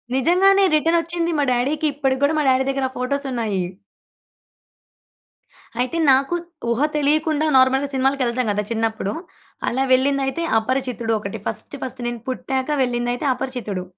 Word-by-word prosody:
నిజంగానే. 385 +8 +4
రిటర్నొచ్చింది. 335 +2 +1
మా - - +3
డాడీకి 285 +6 0
ఇప్పటికి 270 -1 -1
కూడా 305 +2 +3
మా - - +1
డాడీ 260 0 +3
దగ్గర 270 -1 -1
ఫోటోసున్నాయి. 250 -7 -2 2.2
అయితే 255 +6 -1
నాకు 270 +6 +2 0.3
ఊహ 235 +2 0 0.2
తెలియకుండా 305 +1 +1
నార్మల్‌గా 265 +2 +3
సినిమాలకి 265 0 +1
ఎళ్తాం 240 0 -1
కదా! 210 +1 -1
చిన్నప్పుడు. 220 -2 -1 0.6
అలా 265 +2 0
వెళ్ళిందైతే 275 +4 +1 0.2
అపరిచితుడు 245 -1 -2
ఒకటి 200 +1 -6
ఫస్ట్ 225 +6 -5
ఫస్ట్. 255 -1 -6
నేను 240 -2 -4
పుట్టాక 260 +1 -2 0.2
వెళ్ళిందైతే 245 +2 -2
అపరిచితుడు. 245 -8 -4
265 Hz, 125 wpm, -21 LUFS, 240-285 Hz, 2.2 s, నిజంగానే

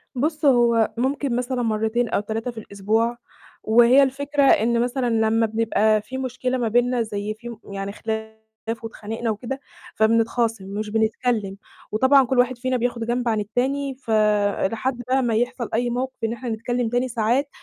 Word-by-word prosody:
بُص 305 +4 -1
هو 235 -4 +4
ممكن 265 +1 0
مثلًا 250 +1 -1
مَرتين 220 +1 0
أو - - +1
3 225 +4 -3
في 230 - -19
الأسبوع، 220 +4 -1 0.5
وهي 240 +5 +6
الفكرة 280 +2 0
إن 235 -2 +4
مثلًا 245 0 0
لما 225 0 +2
بنبقى 220 -1 +2
فيه 255 +5 -7
مشكلة 255 0 -2
ما 235 -2 0
بينّا، 245 +2 +2
زي 210 -1 -3
في 235 +2 -9 0.2
يعني 195 0 -4
خلاف 220 +1 -5 0.5
واتخانقنا 225 +1 -5
وكده، 240 +5 -4 0.4
فبنتخاصم 225 -1 +1
مش 210 +2 -4
بنتكلِّم، 220 -2 0 0.3
وطبعًا 260 +5 +5
كُلّ 255 0 0
واحد 245 0 +2
فينا 255 +1 -1
بياخد 240 -1 -2
جنب 240 +1 -1
عن 220 - +1
التاني، 265 +6 -1
ف 255 -3 -7 0.6
لحد 240 +3 -2
بقى 260 0 +2
ما 230 -2 +1
يحصل 240 +1 -1
أي 240 +2 +1
موقف 250 0 -4
إن 225 - 0
إحنا 240 +1 -6
نتكلِّم 235 +1 -2
تاني 245 +2 0
ساعات، 240 +4 0
235 Hz, 165 wpm, -23 LUFS, 220-255 Hz, 0.6 s, وهي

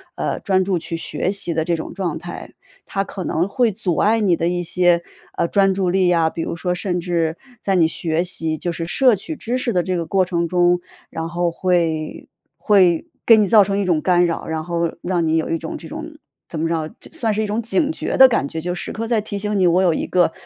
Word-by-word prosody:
呃， - - -2
专 190 -2 +2
注 190 -2 0
去 165 0 -4
学 180 - -2
习 195 -4 +1
的 160 0 0
这 170 +1 0
种 160 - -6
状 180 -6 -3
态。 175 +2 -8 0.3
它 195 - -2
可 190 -1 -6
能 170 +1 0
会 235 +2 +1
阻 180 -4 -2
碍 220 +2 +3
你 195 -5 +3
的 170 +1 0
一 175 0 -1
些， 175 0 +2 0.4
呃， - - +1
专 195 +1 +3
注 185 -1 0
力 185 0 +2
啊， 165 -2 +3
比 165 - -5
如 - - -3
说 180 +2 -1
甚 180 0 -2
至 170 -2 -1 0.2
在 195 - 0
你 170 -3 +4
学 160 0 -1
习 160 -3 -2
就 175 - -3
是 165 0 -4
摄 250 +7 +4
取 260 - -5
知 240 +2 -2
识 250 -1 -1
的 180 - +2
这 185 +1 -2
个 170 -1 -2
过 190 +2 +1
程 170 -1 -1
中， 175 0 +2 0.3
然 165 0 -4
后 175 0 -1
会 165 -3 -1 0.3
会 185 - +3 0.2
给 225 - +8
你 210 -2 +3
造 215 0 +6
成 195 0 -1
一 200 - 0
种 170 -4 +1
干 175 0 +3
扰， 170 -1 -3
然 160 -1 -3
后 170 0 -1
让 175 -2 0
你 160 +1 +2
有 160 - -1
一 165 - 0
种 325 - -6
这 - - -10
种， 315 0 -8 0.3
怎 160 - -6
么 165 - 0
着， 160 -2 -2 0.2
算 240 -9 -1
是 215 +1 0
一 - - -1
种 210 +2 -2
警 290 +7 +1
觉 - - -3
的 265 - +10
感 225 - 0
觉， 160 - -5
就 175 +2 -3
时 180 - -5
刻 225 +1 -4
在 225 -2 +1
提 205 -1 -5
醒 210 0 -1
你， 185 - +4
我 180 +2 +3
有 175 -3 +3
一 - - -3
个 175 -2 +2
180 Hz, 265 characters per minute, -20 LUFS, 170-200 Hz, 0.4 s, 的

